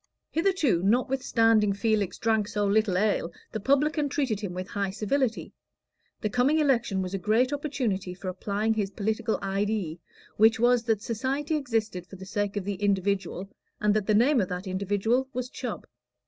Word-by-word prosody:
Hitherto, 325 - +2
notwithstanding 225 -1 +3
Felix 205 -2 0
drank 220 -2 +1
so 205 -1 -1
little 200 -2 +2
ale, 200 -4 +1 0.2
the - - -3
publican 290 +5 +2
treated 265 -8 -1
him 200 -4 -4
with 185 +1 -5
high 200 -1 -1
civility. 225 +5 -1 0.7
The 215 - 0
coming 255 +6 +3
election 240 -10 +2
was 185 +1 -5
a 195 - -1
great 230 +8 +2
opportunity 240 -11 -2
for 185 +1 -8
applying 200 +4 -1
his 210 -3 -1
political 220 +2 -1
"idee," 195 -4 -1 0.4
which 220 +1 +5
was, 245 0 +4
that 220 -3 0
society 270 +7 -1
existed 220 - -2
for 195 - -11
the 190 0 -10
sake 205 0 -2
of 195 - -3
the 200 -1 -4
individual, 195 -1 0 0.3
and 210 0 +3
that 215 -2 0
the 215 - +3
name 245 +3 +4
of 185 - -2
that 180 +2 -4
individual 205 +7 0
was 250 +1 -4
Chubb. 245 -5 -5
215 Hz, 170 wpm, -27 LUFS, 195-245 Hz, 0.7 s, which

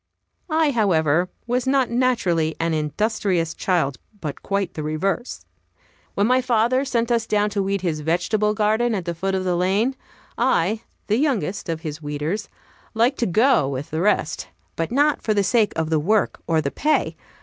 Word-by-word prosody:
I, 315 -1 +2
however, 175 - +2 0.2
was 245 +1 -1
not 265 -3 +2
naturally 185 -11 +1
an 165 0 0
industrious 165 +2 0
child, 160 -8 0 0.2
but 150 -5 -5
quite 200 -2 -2
the 155 - -5
reverse. 175 +10 -2 0.7
When 200 - +2
my 255 +3 +3
father 250 +1 +2
sent 235 -3 0
us 230 -2 +1
down 210 0 +1
to 200 -1 0
weed 195 0 -1
his 165 -4 -1
vegetable 210 +7 0
garden 220 +2 +1
at 185 -4 -3
the 170 - -2
foot 190 +3 -2
of 190 - -1
the 180 -1 0
lane, 200 +9 +1 0.4
I, 220 -4 +2 0.2
the 215 - +1
youngest 220 - -1
of 160 -1 -2
his 155 -1 -6
weeders, 150 +8 -3 0.5
liked 240 +5 +2
to 235 - +1
go 220 - +3
with 140 +1 -5
the 160 +1 -1
rest, 200 -5 0 0.3
but 165 +4 -2
not 290 +3 +2
for 215 - 0
the 200 - +3
sake 220 +1 +2
of 160 0 -2
the 160 - +3
work 205 +7 +1
or 160 -2 +2
the 140 -2 -2
pay. 305 +1 0
200 Hz, 180 wpm, -22 LUFS, 165-235 Hz, 0.7 s, my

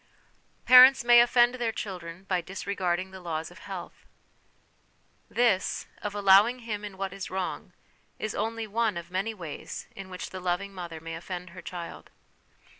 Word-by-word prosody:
Parents 255 0 +9
may 240 0 +8
Offend 240 0 +4
their 240 -3 -1
Children 180 -4 -7
by 185 -2 0
Disre 195 +3 -5
garding 185 0 -1
the 190 - -9
Laws 165 -2 -4
of 175 - -14
Health. 190 -3 -9 1.2
This, 225 -6 +1 0.2
of 210 -1 -4
allowing 205 +5 +5
him 210 -2 -4
in 200 -2 -8
what 190 -1 -3
is 195 -1 -6
wrong, 190 -1 -4 0.4
is 215 - -3
only 225 0 -2
one 220 -2 0
of 170 0 -8
many 195 +5 -2
ways 165 -7 -7
in 195 -1 -9
which 180 -2 -7
the 185 - -6
loving 185 +2 -2
mother 170 -3 -7
may 165 +1 -7
offend 180 +1 -6
her 185 +1 -10
child. 170 -1 -8
190 Hz, 165 wpm, -28 LUFS, 180-220 Hz, 1.2 s, Parents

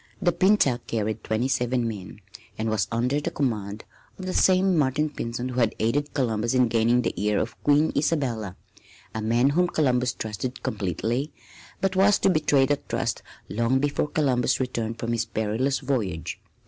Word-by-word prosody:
The 175 -2 +2
Pinta 175 -8 +3
carried 110 -1 -2
twenty 110 +4 0
seven 125 -2 0
men 105 -2 -7 0.4
and 110 0 -1
was 110 -3 0
under 125 +5 0
the - - -2
command 105 -6 -2 0.3
of 185 - -7
the 185 - -3
same 185 0 +4
Martin 150 0 +1
Pinzon 120 -2 -4
who 125 0 -2
had 115 -3 +2
aided 145 +7 -1
Columbus 115 -2 0
in 125 -2 +4
gaining 120 +2 +3
the - - -1
ear 105 -1 +2
of 115 +3 -3
Queen 145 +2 +3
Isabella 125 - -1 0.6
a 110 - -3
man 120 +5 +2
whom 180 +4 +2
Columbus 125 -7 +1
trusted 110 +4 -5
completely, 110 - -2 0.5
but 195 -1 +1
who 185 - 0
was 200 +1 +5
to - - +3
betray 145 -4 +3
that 145 +1 -2
trust - - -1 0.3
long 115 +4 +1
before 145 +2 0
Columbus 135 -5 +1
returned 115 -3 -2
from 115 0 -3
his 115 -1 0
perilous 110 +5 -1
voyage. 110 - -2
125 Hz, 175 wpm, -25 LUFS, 110-145 Hz, 0.6 s, was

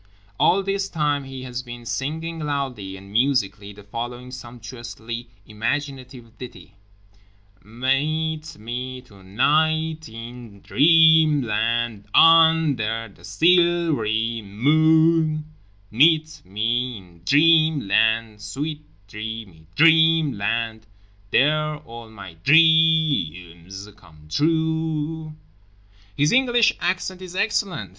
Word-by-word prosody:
All 195 +2 +3
this 195 0 -2
time 145 -3 -1
he 135 -1 -9
has 125 -1 -6
been 120 -1 -11
singing 160 +8 -4
loudly 135 -10 -4
and 100 +1 -14
musically 105 -4 0
the 105 0 -15
following 120 +4 -7
sumptuously 120 -1 -9 0.2
imaginative 125 +1 -5
ditty: 95 -7 -11 0.9
"mEEt 155 - -2
me 125 +3 -6
tonIght 155 +10 -1
in 115 -2 -11
DREAmland, 130 -9 +3
UNder 150 -10 +4
the - - -22
SIL 175 -1 +2
v'ry 110 -1 -2
mOOn, 155 +7 +2 0.5
meet 155 +6 +2
me 115 +5 -2
in 85 -3 -17
DREAmland, 120 - +2
sweet 145 +8 -5 0.2
dreamy 105 -6 -8
DREAmland— 140 -9 +2 0.5
there 155 +5 +1
all 115 -5 -12
my 100 -6 -12
DRE 160 - +3
ams 95 +4 -11
come 80 -6 -20
trUE." 160 - -1 0.8
His 145 +1 +2
English 240 -3 +3
accent 185 +1 -3
is 185 -1 -10
excellent. 195 - -2
130 Hz, 95 wpm, -22 LUFS, 110-160 Hz, 0.9 s, UNder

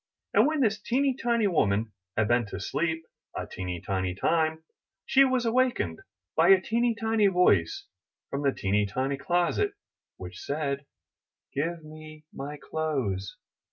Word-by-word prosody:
And - - +5
when 310 -1 0
this 215 -4 +1
teeny 265 +5 +1
tiny 235 -3 +1
woman 110 - +1 0.3
had 110 -1 +3
been 120 -1 +2
to 95 - -6
sleep 160 +9 -2 0.3
a - - -3
teeny 90 -2 -5
tiny 95 0 -2
time, 160 - +1 0.4
she 275 - +5
was 255 -2 +1
awakened 235 - +1 0.4
by 165 +1 +5
a 195 -1 +8
teeny 230 +4 +1
tiny 220 -2 +2
voice 180 - +3 0.5
from 140 - -2
the 140 -1 +3
teeny 100 -2 0
tiny 130 +7 -1
closet, 175 - +1 0.4
which - - -8
said: 140 - -3 0.7
''Give 165 +3 -2
me 155 0 -12
my 145 +2 -6
clothes! 130 -13 -2
155 Hz, 145 wpm, -28 LUFS, -, 0.7 s, a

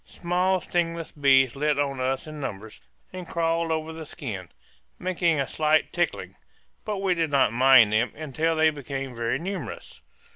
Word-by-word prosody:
Small 180 +2 0
stingless 170 -1 -2
bees 135 -3 +3
lit 150 +1 0
on 140 -2 -1
us 130 +1 -1
in 155 -1 -8
numbers 110 -5 -7 0.3
and 185 -2 -7
crawled 165 0 0
over 160 0 -2
the 160 -1 -8
skin, 110 - -7 0.5
making 170 -4 0
a 135 - +1
slight 155 0 +1
tickling; 175 0 -2 0.5
but 210 -2 -3
we 190 -1 +1
did 165 -2 -1
not 135 -6 +3
mind 125 -3 +6
them 115 +3 +2
until 155 +2 -1
they 160 0 +4
became 135 -3 -6
very 115 +2 -1
numerous. 170 - -6
155 Hz, 160 wpm, -25 LUFS, 135-170 Hz, 0.5 s, mind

